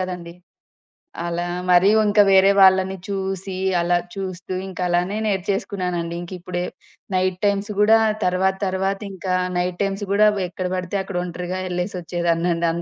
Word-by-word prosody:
గదండీ. 180 -2 -5 0.9
అలా 175 0 -2 0.2
మరి 180 +2 +6 0.2
ఇంకా 205 0 +5
వేరే 195 +1 +6
వాళ్ళని 190 0 +5
చూసి 195 -1 -3 0.3
అలా 175 +1 +2 0.2
చూస్తూ 185 -1 -5
ఇంకా 185 -1 -7
అలానే 180 +4 0
నేర్చేసుకున్నానండి. 185 -3 -2
ఇంకిప్పుడే 180 0 -5 0.5
నైట్ 185 0 0
టైమ్స్ 200 +1 0
గూడా 220 +2 +6 0.3
తర్వాత 190 +1 +2
తర్వాత 190 +1 -1
ఇంకా 185 0 -3 0.2
నైట్ 180 0 -1
టైమ్స్ 195 +1 -1
గూడా 210 +1 +5
వ - - -1
ఎక్కడ 185 +1 -4
బడితే 185 +2 -3
అక్కడ 190 -1 -5
ఒంటరిగా 180 +1 -4
యెళ్లేసొచ్చేదాన్నండి. 175 -2 -1
185 Hz, 130 wpm, -22 LUFS, 175-195 Hz, 0.9 s, మరి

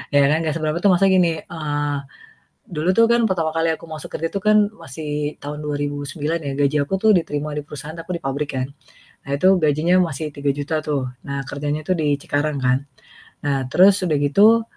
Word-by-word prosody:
Ya 140 - +6
kan. 155 - +3
Gak 155 - -1
seberapa 155 0 -1
tuh - - +5
masa 195 +2 +3
gini, 170 -4 +2
eee, 145 -3 -2 0.7
dulu 165 0 -2
tuh 230 - +7
kan 235 +1 +3
pertama 165 -4 0
kali 165 0 +1
aku - - -13
masuk 155 -1 -7
kerja 165 - -1
tuh 200 - -2
kan 215 +1 +4 0.2
masih 150 +1 -4
tahun 150 +1 -7
2009 145 +2 -3
ya 140 -3 -4
gaji 145 +1 +2
aku 190 +7 -1
tuh 220 +2 +4
diterima 150 -4 -1
di 150 - -3
perusahaan 150 +2 -7
aku 170 +1 -5
di - - -16
pabrik 140 0 -2
kan, 130 - 0 0.6
nah 140 - -3
itu 150 +7 +4
gajinya 155 +3 +2
masih 160 -4 0
Rp3.000.000 145 +2 -2
tuh. 140 -4 -1 0.2
Nah 140 0 -3
kerjanya 145 +1 -3
tuh 185 +4 -1
di 150 -2 +1
Cikarang 145 -1 -1
kan. 130 +2 +1 0.6
Nah 135 -3 0
terus 190 +8 +5
udah 155 - +1
gitu, 200 +11 +5
150 Hz, 195 wpm, -21 LUFS, 145-165 Hz, 0.7 s, tuh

